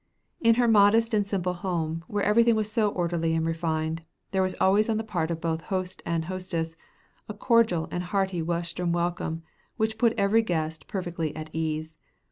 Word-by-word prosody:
In 230 -1 +5
her 240 0 +3
modest 225 +2 +5
and 205 -2 +2
simple 185 -3 -1
home, 165 -3 -3
where 205 -1 -1
everything 230 +2 +4
was 215 -1 -1
so 215 -1 +2
orderly 170 -3 0
and 160 0 0
refined, 165 -1 -1 0.3
there 190 -1 +1
was 185 -1 0
always 205 +4 +4
on 220 - +1
the 220 - -2
part 175 -7 -2
of 165 -1 -2
both 165 -1 -2
host 185 -1 -3
and 165 -1 0
hostess 170 -3 -3 0.5
a 210 - -5
cordial 220 -7 +2
and 175 0 -3
hearty 190 -2 0
Western 170 +1 -1
welcome 170 -1 -2 0.3
which 220 -1 -1
put 230 -1 +4
every 200 +2 +4
guest 160 -6 -3
perfectly 170 -5 -3
at 155 0 -7
ease. 155 0 -3
180 Hz, 180 wpm, -27 LUFS, 165-210 Hz, 0.5 s, In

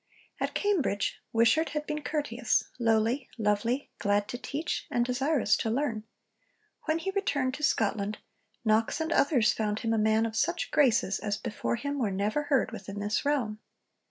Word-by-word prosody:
At - - -2
Cambridge 335 - 0
Wishart 230 +8 +3
had 300 - -2
been 300 0 -3
'courteous, 275 -6 0 0.2
lowly, 230 +3 +1
lovely, 225 +5 0
glad 205 0 +1
to 245 - -4
teach, 300 +5 -3
and 240 0 +1
desirous 260 -2 +2
to 225 - -1
learn'; 225 -3 -1 0.8
when 315 0 +1
he 385 +4 -3
returned 285 -10 0
to 300 - -6
Scotland, 210 -5 +1 0.5
Knox 220 +5 +2
and 320 +1 -1
others 265 -7 +3
found 210 -1 -1
him 225 -2 0
'a 225 - +2
man 220 +1 +3
of 225 -1 -4
such 345 +9 0
graces 230 -8 +3
as 205 -1 -2
before 230 +1 -2
him 285 +4 -3
were 225 -5 +1
never 205 +8 0
heard 275 -5 +2
within 200 +1 -7
this 205 +1 -1
realm.' 245 -8 0
235 Hz, 165 wpm, -29 LUFS, 215-290 Hz, 0.8 s, Wishart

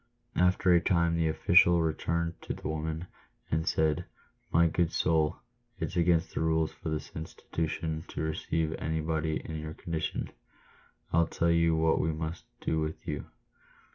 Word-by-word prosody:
After 90 0 +4
a 85 - +5
time 85 -1 +2
the 80 -1 +2
official 85 +2 +5
returned 85 +1 -1
to - - -4
the - - -6
woman, 80 +2 -3 0.5
and 80 +1 0
said, 80 -1 +1 0.2
" - - -41
My 85 +1 +5
good 85 0 +1
soul, 80 0 +2 0.4
it's 80 - -3
against 85 0 +2
the - - -2
rules 80 -1 +1
of 80 - -2
this 75 - -4
institution 80 0 -3
to - - -5
receive 80 0 -1
anybody 80 0 -1
in 80 -1 -4
your 75 0 -6
condition. 80 -2 -3 0.8
I'll 85 0 +4
tell 85 0 +1
you. 85 -1 +4
what 80 0 +3
we 80 - +1
must 80 +2 -5 0.2
do 80 - 0
with 80 +2 -4
you. 75 -3 -3
80 Hz, 160 wpm, -30 LUFS, 80-85 Hz, 0.8 s, a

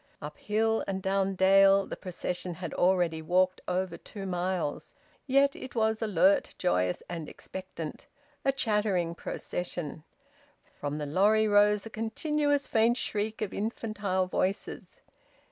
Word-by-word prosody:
Up 150 +1 -8
hill 220 +1 +1
and 190 -1 -2
down 195 0 0
dale 195 +1 +6
the - - -6
procession 180 -1 -4
had - - -6
already 175 -3 +2
walked 185 +3 +2
over 180 -1 -1
two 200 -2 -9
miles. 180 -4 -2 0.3
Yet 275 +1 +4
it 260 - -9
was 220 -1 +1
alert, 195 -2 +3
joyous, 90 - 0
and 165 -3 -5
expectant: 185 -4 -8 0.4
a 270 - +3
chattering 210 -9 0
procession. 170 -2 -5 0.7
From 145 0 -4
the 150 - -3
lorry 210 +8 +3
rose 205 0 +4
a 225 - -8
continuous 290 +6 0
faint 230 +2 +3
shriek 215 0 -2
of 205 - -4
infantile 210 -3 -1
voices. 195 - -3
195 Hz, 130 wpm, -29 LUFS, 180-220 Hz, 0.7 s, dale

